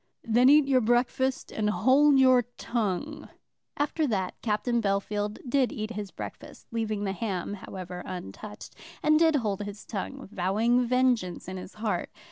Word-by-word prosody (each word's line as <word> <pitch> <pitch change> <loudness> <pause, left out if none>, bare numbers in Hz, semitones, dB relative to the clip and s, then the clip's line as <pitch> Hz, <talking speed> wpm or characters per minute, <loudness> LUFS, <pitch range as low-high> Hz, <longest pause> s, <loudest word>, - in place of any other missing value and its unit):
"Then 240 +3 +4
eat 295 -1 +6
your 260 -2 +4
breakfast, 245 +3 +1
and 210 -1 0
hold 265 +9 +4
your 255 -1 +6 0.2
tongue." 235 +7 -3 0.5
After 295 +2 0
that 190 -6 -1
Captain 235 +2 0
Bellfield 205 +1 -1
did 260 -2 +2
eat 215 +1 -4
his 210 -3 -5
breakfast, - - -9
leaving 215 -3 -2
the 195 -1 -1
ham 195 -3 -3
however 180 -2 -7
untouched, 185 - -8 0.3
and 305 0 +5
did 325 -2 +4
hold 210 -7 -1
his 205 0 -7
tongue, 265 +6 -5
vowing 220 +6 +2
vengeance 245 -9 +1
in 185 0 -5
his 185 +1 -9
heart. 215 0 -2
220 Hz, 150 wpm, -28 LUFS, 200-255 Hz, 0.5 s, eat